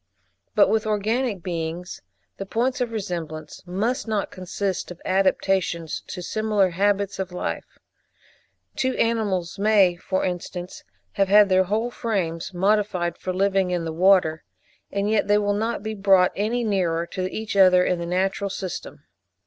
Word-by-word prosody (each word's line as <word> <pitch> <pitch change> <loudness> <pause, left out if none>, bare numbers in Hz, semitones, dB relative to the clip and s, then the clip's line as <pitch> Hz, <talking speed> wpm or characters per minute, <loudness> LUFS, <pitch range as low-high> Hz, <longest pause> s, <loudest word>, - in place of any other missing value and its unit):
But - - +6
with 220 -1 +1
organic 215 -1 0
beings 170 +1 -4 0.4
the 195 - -5
points 250 +5 0
of 240 -2 -1
resemblance 170 -7 -5
must 225 +9 -1
not 215 -2 -1
consist 185 +1 -3
of 180 -1 -9
adaptations 185 -3 0
to 180 - -6
similar 210 -2 +1
habits 200 +2 0
of 190 -1 -3
life: 180 - -5 1.0
two 260 0 0
animals 205 -6 0
may, 200 -4 +4
for 190 +2 -2
instance, 180 0 -5 0.3
have 195 - +1
had 205 +1 +6
their 185 0 +4
whole 220 +5 -1
frames 185 -10 -2
modified 190 -2 +1
for 185 - -4
living 195 0 +1
in 175 -2 -1
the 160 - -4
water, 175 -2 +3 0.5
and 200 0 -1
yet 215 -1 +1
they 205 0 +4
will 205 -1 +1
not 220 +1 -2
be 220 0 -3
brought 195 -3 +4
any 225 +4 0
nearer 175 -6 0
to 185 +1 -4
each 220 -1 -4
other 185 -2 +6
in 180 - 0
the 170 - -4
natural 195 +3 0
system. 190 -2 -6
195 Hz, 155 wpm, -24 LUFS, 180-210 Hz, 1.0 s, But